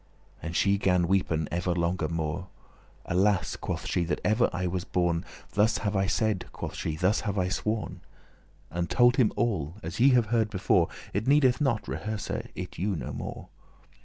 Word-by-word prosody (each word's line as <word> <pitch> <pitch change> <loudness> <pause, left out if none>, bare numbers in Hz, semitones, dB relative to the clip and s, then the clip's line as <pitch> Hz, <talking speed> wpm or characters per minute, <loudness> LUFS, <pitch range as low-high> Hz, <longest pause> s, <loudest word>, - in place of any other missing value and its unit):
And 85 +1 -5
she 100 +1 +3
gan 90 -3 +3
weepen 85 -5 +1
ever 90 +1 0
longer 85 -1 0
more. 85 +2 -3 0.6
"Alas," 95 -4 +1
quoth - - -4
she, 90 - 0
"that 85 - -1
ever 110 +3 +3
I 90 0 -2
was 90 0 -1
born! 85 -2 0 0.3
Thus 105 +1 +3
have 105 0 -2
I 95 0 +2
said," 110 -3 0
quoth - - -6
she; 80 - -3
"thus 95 +6 +2
have 105 -2 -2
I 90 -1 +1
sworn. 105 +3 -2 0.4
" - - -32
And 85 0 -2
told 125 +1 +4
him 120 -6 +4
all, 90 -9 -1
as 85 +5 -5
ye 130 +3 +7
have 120 -2 +4
heard 110 -2 +2
before: 95 -4 +2 0.3
It 105 +4 -1
needeth 135 -2 +4
not 130 -7 +1
rehearse 100 +10 -4
it - - -6
you 100 +2 0
no - - -5
more. - - -6
95 Hz, 185 wpm, -28 LUFS, 85-110 Hz, 0.6 s, ye